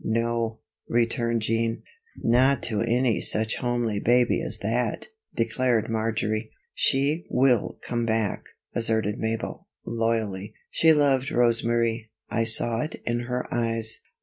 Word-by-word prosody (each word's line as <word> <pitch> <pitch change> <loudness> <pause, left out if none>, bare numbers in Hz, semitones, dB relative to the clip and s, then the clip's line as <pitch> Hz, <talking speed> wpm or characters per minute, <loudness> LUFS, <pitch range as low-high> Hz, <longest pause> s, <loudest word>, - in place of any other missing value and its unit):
"No," 115 0 -1 0.3
returned 115 -1 +1
Jean. 115 +1 -1 0.4
"Not 130 +4 +3
to 110 -3 0
any 120 0 +1
such 110 +1 +1
homely 120 -4 -1
baby 120 +2 +3
as - - 0
that," - - -1 0.3
declared 115 -1 0
Marjory. 110 -1 -1 0.2
"She 145 +5 +1
will 125 -2 +2
come 120 -1 -2
back," 110 -2 -1 0.3
asserted 110 -2 0
Mabel, 110 0 -3 0.2
loyally. 115 -4 -2 0.2
"She 160 - +4
loved 140 -3 +3
Rosa 120 -3 +2
Marie 115 -1 0 0.2
I 115 0 +1
saw 115 0 +4
it 155 - -5
in 120 0 0
her 125 0 -2
eyes." 115 -2 -1
115 Hz, 125 wpm, -25 LUFS, 110-120 Hz, 0.4 s, She